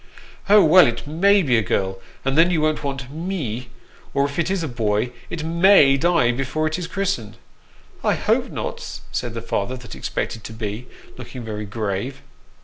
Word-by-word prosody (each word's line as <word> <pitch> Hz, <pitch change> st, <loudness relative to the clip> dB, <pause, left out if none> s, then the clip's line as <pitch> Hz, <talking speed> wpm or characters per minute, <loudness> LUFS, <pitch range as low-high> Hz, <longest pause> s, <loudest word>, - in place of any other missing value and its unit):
"Oh, 210 Hz, 0 st, +8 dB
well, 175 Hz, 0 st, +7 dB
it 120 Hz, +2 st, -3 dB
may 195 Hz, +7 st, +3 dB
be 125 Hz, -6 st, +3 dB
a -, -, +1 dB
girl, 95 Hz, -1 st, -1 dB, 0.3 s
and 135 Hz, 0 st, +1 dB
then 165 Hz, +3 st, +5 dB
you 175 Hz, -3 st, +1 dB
won't 155 Hz, 0 st, 0 dB
want 135 Hz, -2 st, -4 dB
me; 150 Hz, -, -4 dB, 0.5 s
or 140 Hz, 0 st, +3 dB
if 140 Hz, +3 st, -4 dB
it 170 Hz, -, +1 dB
is 190 Hz, -3 st, -1 dB
a -, -, -1 dB
boy, 115 Hz, -2 st, -1 dB, 0.2 s
it 160 Hz, -, -4 dB
may 165 Hz, -3 st, +5 dB
die 165 Hz, -4 st, +3 dB
before 135 Hz, +5 st, -2 dB
it 155 Hz, +3 st, -1 dB
is 175 Hz, -, -4 dB
christened." 175 Hz, -, -2 dB, 0.3 s
" -, -, -28 dB
I -, -, +2 dB
hope -, -, +1 dB
not," -, -, -5 dB
said -, -, -3 dB
the -, -, -5 dB
father 115 Hz, +6 st, -2 dB
that 125 Hz, -1 st, -11 dB
expected 110 Hz, -, -4 dB
to 110 Hz, -, -7 dB
be, 110 Hz, +2 st, -5 dB, 0.3 s
looking 125 Hz, -2 st, -8 dB
very 105 Hz, -1 st, -5 dB
grave. 105 Hz, +4 st, -4 dB
135 Hz, 190 wpm, -22 LUFS, 115-165 Hz, 0.5 s, Oh